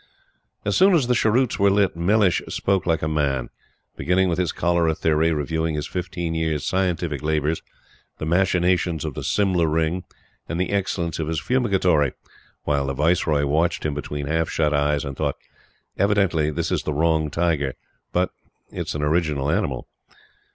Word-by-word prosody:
As 100 - +1
soon 190 0 +5
as 150 -7 +3
the 125 - +2
cheroots 120 +2 +2
were 100 0 +5
lit, 100 -2 +2
Mellish 95 +2 +2
spoke 95 -2 0
like 80 -3 +1
a - - +1
man; 70 -5 -1 0.4
beginning 95 +1 +1
with 85 +1 -1
his 90 -3 +1
cholera 85 -1 +1
theory, 80 +1 +2
reviewing 80 +1 -1
his 75 - -2
fifteen 85 -2 -4
years' 80 -3 -1
"scientific 90 -6 -1
labors," 75 +1 0 0.6
the - - -4
machinations 90 -1 +1
of 75 - -3
the - - -6
"Simla 95 -5 +2
Ring," 80 +3 0 0.5
and 85 - -2
the 90 +1 -1
excellence 90 -5 -1
of 80 - -2
his 80 -1 -1
Fumigatory, 95 - +2 0.5
while 70 -2 0
the 70 - -2
Viceroy 75 -1 +2
watched 80 +5 0
him 75 - 0
between 75 0 -4
half 80 +2 0
shut 75 -2 +1
eyes 75 +1 +1
and 70 -1 -5
thought: - - -1 0.6
"Evidently, 100 -7 +2
this 75 - -2
is - - +1
the 75 - -3
wrong 80 0 +2
tiger; 75 -5 0 0.4
but 90 +1 +1 0.4
it - - -5
is - - -3
an 75 - -2
original 75 -2 +1
animal." - - -1
80 Hz, 170 wpm, -23 LUFS, 75-90 Hz, 0.6 s, soon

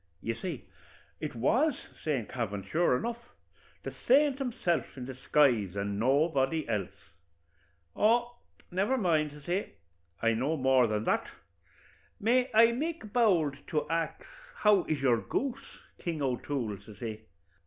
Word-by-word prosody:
"You 115 - -2
see 155 +3 -6 0.5
it - - -5
was 250 - +2 0.3
Saint 135 -8 -1
Kavin, 105 -5 -3
sure 125 - +2
enough 235 - -3 0.6
the - - -5
saint 275 +1 +5
himself 180 - -1
in 125 - -5
disguise, 125 -6 +2
and 100 0 -2
nobody 140 +4 +2
else. 105 -5 -1 1.1
'Oh, 240 +2 +2 0.4
never 200 +9 +1
mind,' 160 -8 +2
says 145 -1 -14
he, 180 +3 0 0.6
'I 115 0 +4
know 135 +8 0
more 130 -2 +4
than 105 0 -1
that. - - 0 0.9
May 250 +4 +2
I 230 +1 +6
make 280 -4 -4
bowld 175 - +3
to 150 -2 -1
ax 165 -1 -2 0.3
how 210 -4 +4
is 155 -2 -1
your 125 -4 +3
goose, 270 0 -4 0.2
King 165 -4 -3
O'Toole?' 125 -5 -2
says 105 -3 -13
he. 110 -1 -5
150 Hz, 135 wpm, -30 LUFS, -, 1.1 s, I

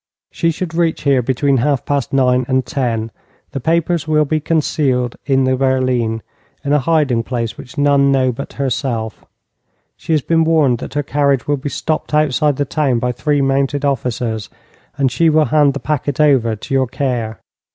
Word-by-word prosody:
She 165 - 0
should 165 +1 -4
reach 165 -1 0
here 140 -3 +3
between 135 +3 +1
half 135 +2 0
past 140 -3 -1
nine 125 -2 +2
and 130 -1 +1
ten. 115 -4 -2 0.4
The 135 - -4
papers 165 +2 0
will 155 -1 +3
be 155 +2 0
concealed 145 -6 0
in 135 -1 +3
the 130 0 +2
berline, 130 -4 0 0.4
in 140 - +1
a 150 - +4
hiding 145 -5 +1
place 115 -1 -3
which 130 +2 -12
none 140 -1 +3
know 130 -2 +2
but 140 +4 -7
herself. 120 -5 -3 0.7
She - - -6
has 150 -4 +1
been 165 -1 +2
warned 155 -7 +2
that - - -8
her 145 - 0
carriage 140 -2 +1
will 145 0 0
be 140 +2 -5
stopped 155 +1 -2
outside 150 -1 +2
the 145 - -1
town 140 -3 0
by 125 +1 -1
three 145 +3 0
mounted 135 +1 0
officers, 120 -5 -2 0.5
and 135 -3 +1
she 165 +7 +3
will 155 0 +3
hand 145 -3 +3
the - - -3
packet 145 -2 -2
over 130 -7 +3
to 110 - -7
your 135 -1 +2
care. 120 -4 -3
140 Hz, 185 wpm, -17 LUFS, 125-150 Hz, 0.7 s, a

